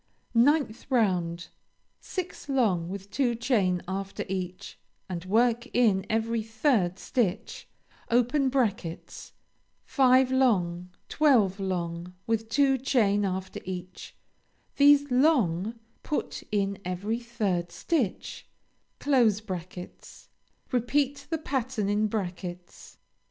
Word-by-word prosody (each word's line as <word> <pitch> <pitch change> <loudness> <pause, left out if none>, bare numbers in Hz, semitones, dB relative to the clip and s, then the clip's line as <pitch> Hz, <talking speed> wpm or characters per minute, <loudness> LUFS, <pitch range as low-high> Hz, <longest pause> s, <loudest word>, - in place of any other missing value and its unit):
9th 250 -1 +2
round 175 -8 0 0.5
Six 365 -5 -6
long 200 -11 +1
with 195 +1 -7
two 245 0 +1
chain 210 -7 +1
after 195 +1 -4
each 185 -1 -5 0.3
and 175 -1 -5
work 235 +4 +2
in 210 -6 +3
every 225 +1 0
third 220 - +1
stitch, 230 -3 -2 2.2
(five 260 -1 +4
long, 180 -9 +1 0.2
twelve 230 -11 +3
long 175 -2 -3
with 225 -1 -1
two 270 +2 +3
chain 210 -6 +2
after 190 -1 -3
each, 185 0 -7 0.6
these 285 -1 +5
long 235 - +2 0.3
put 300 - -3
in 200 -1 0
every 195 +6 -2
third 205 -8 -2
stitch); 265 - -2 2.2
repeat 275 +3 0
the 325 - 0
pattern 260 -8 -2
in 210 +1 +2
brackets. 180 -4 -6
215 Hz, 95 wpm, -27 LUFS, 185-255 Hz, 2.2 s, these